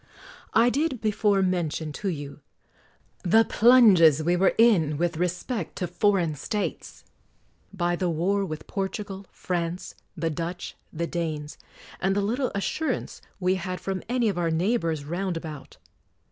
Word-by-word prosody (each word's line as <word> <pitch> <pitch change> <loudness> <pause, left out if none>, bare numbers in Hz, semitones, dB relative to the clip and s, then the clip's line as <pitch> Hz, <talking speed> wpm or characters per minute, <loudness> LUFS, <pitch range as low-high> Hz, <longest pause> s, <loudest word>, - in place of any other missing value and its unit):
I 235 +2 +5
did 285 -2 0
before 210 -2 +2
mention 165 -4 -1
to 200 - 0
you 145 -4 -6 0.8
the 220 +5 +4
plunges 200 - +6
we 175 +2 +2
were 190 +2 +3
in 175 -11 +4
with 170 0 -1
respect 180 +3 -2
to 180 - -2
foreign 175 -2 +1
States; 200 +8 -4 0.7
by 175 -3 0
the 180 0 -1
war 185 +5 +1
with 155 -5 -5
Portugal, 195 0 -4
France, 175 0 -3 0.2
the 165 0 -1
Dutch, 170 +3 -5 0.2
the 170 +1 -2
Danes, 155 -3 -4 0.4
and 195 +1 +1
the 205 - +2
little 245 +6 -1
assurance 255 +7 -2 0.2
we 185 0 +2
had 185 0 -4
from 190 -1 -3
any 245 -2 +1
of 195 -4 -1
our 170 -1 +1
neighbors 165 -3 0
round 175 +3 -2
about. 155 -4 -8
180 Hz, 145 wpm, -26 LUFS, 165-205 Hz, 0.8 s, plunges